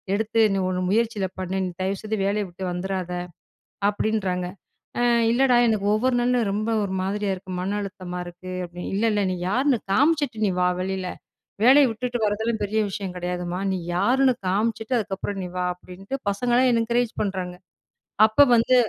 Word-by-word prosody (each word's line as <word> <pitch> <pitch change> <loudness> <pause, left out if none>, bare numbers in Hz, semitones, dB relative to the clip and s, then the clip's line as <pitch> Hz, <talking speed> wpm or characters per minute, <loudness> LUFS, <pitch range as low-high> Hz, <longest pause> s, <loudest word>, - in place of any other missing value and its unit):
எடுத்து 220 +2 +1
நீ - - 0
உன் 185 0 -1
முயற்சில 220 -1 +1
பண்ணு. 185 0 -3
நீ - - -5
தயவுசெய்து 210 +3 -2
வேலைய 205 +1 0
விட்டு 185 +2 -7
வந்துராத!" 180 0 -3 0.8
அப்பிடின்றாங்க. 200 -4 -1 0.5
அ - - +1 0.3
இல்லடா, 250 0 +4
எனக்கு 215 -3 +1
ஒவ்வொரு 250 +3 +1
நாளும் 240 -3 +1
ரொம்ப 215 +2 -1
ஒரு 190 -1 -3
மாதிரியா 200 +1 -1
இருக்கு. 190 0 -10
மன 195 +3 -2
அழுத்தமா 185 -2 -6
இருக்கு. 175 +1 -9
அப்பிடின்னு 175 0 -7
"இல்ல, 205 - 0
இல்ல 205 -1 +1
நீ - - -1
யாருன்னு 255 +2 +2
காமிச்சுட்டு 285 -6 +2
நீ - - +1
வா! 180 - +4
வெளில 190 0 -3 0.6
வேலைய 270 +4 +7
விட்டுட்டு 245 +2 -3
வரதெல்லாம் 220 +2 0
பெரிய 215 +2 0
விஷயம் 190 -1 -5
கிடையாதும்மா! 180 0 -3
நீ 190 - 0 0.2
யாருன்னு 260 +7 +3
காமிச்சுட்டு 220 +5 0
அதுக்கப்பறம் 195 -2 -3
நீ - - -4
வா!" 180 - 0
அப்பிடின்ட்டு 185 +8 -7
பசங்கள்ல்லாம் 245 +5 +2
என்க்கரேஜ் 235 0 +1
பண்றாங்க. 185 -3 -3 0.7
அப்போ 220 +6 +5
வந்து 235 +3 +3
205 Hz, 160 wpm, -24 LUFS, 185-230 Hz, 0.8 s, வேலைய